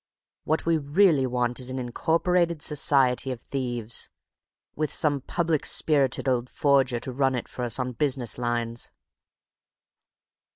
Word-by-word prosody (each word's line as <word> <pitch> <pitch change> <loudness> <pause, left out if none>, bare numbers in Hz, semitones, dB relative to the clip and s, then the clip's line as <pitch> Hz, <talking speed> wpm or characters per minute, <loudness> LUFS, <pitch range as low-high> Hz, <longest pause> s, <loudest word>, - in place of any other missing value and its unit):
What 155 +1 -1
we 165 -1 +2
really 145 -1 +3
want 125 0 -1
is 130 0 -1
an 130 - -3
Incorporated 165 +6 0
Society 135 -3 +3
of 125 - -5
Thieves, 120 -4 -3 0.7
with 155 -1 -2
some 145 -3 +2
public 165 +1 -1
spirited 140 -4 +2
old 125 -1 0
forger 135 -4 +2
to 130 - -5
run 135 0 +1
it 125 - -4
for - - -8
us 120 -2 -1
on 125 -1 -2
business 125 -2 -1
lines." 120 -1 -2
130 Hz, 135 wpm, -25 LUFS, 125-150 Hz, 0.7 s, really